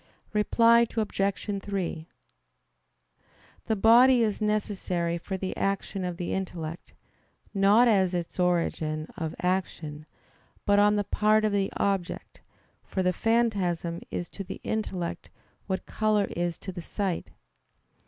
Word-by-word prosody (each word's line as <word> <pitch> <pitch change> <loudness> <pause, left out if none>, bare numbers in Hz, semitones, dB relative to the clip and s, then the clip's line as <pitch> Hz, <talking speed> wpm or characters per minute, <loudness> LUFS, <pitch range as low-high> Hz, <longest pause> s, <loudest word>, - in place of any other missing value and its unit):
Reply 230 +2 +4
Obj. 200 -1 -1
3: 180 -5 -3 1.6
The 220 - +2
body 235 +4 +6
is 215 -1 -1
necessary 190 -5 -1
for 190 +2 -4
the 190 0 -4
action 195 0 -2
of 180 -1 -3
the 175 - -3
intellect, 175 -3 -5 0.6
not 205 +4 +5
as 190 -5 +3
its 175 +1 -4
origin 165 -3 0
of 160 -4 -4
action, 160 -5 -2 0.6
but 205 0 +4
on 210 0 +5
the 205 - +1
part 215 +1 +2
of 215 - +1
the 200 -1 0
object; 195 -3 -2 0.4
for 190 - -2
the 180 0 +2
phantasm 190 -7 0
is 175 - -4
to 200 - -7
the - - -7
intellect 190 -6 -3 0.4
what 190 -1 -2
color 215 -2 +1
is 175 -1 -2
to 190 - -7
the 175 -1 -7
sight. 190 0 -3
195 Hz, 130 wpm, -27 LUFS, 175-210 Hz, 1.6 s, body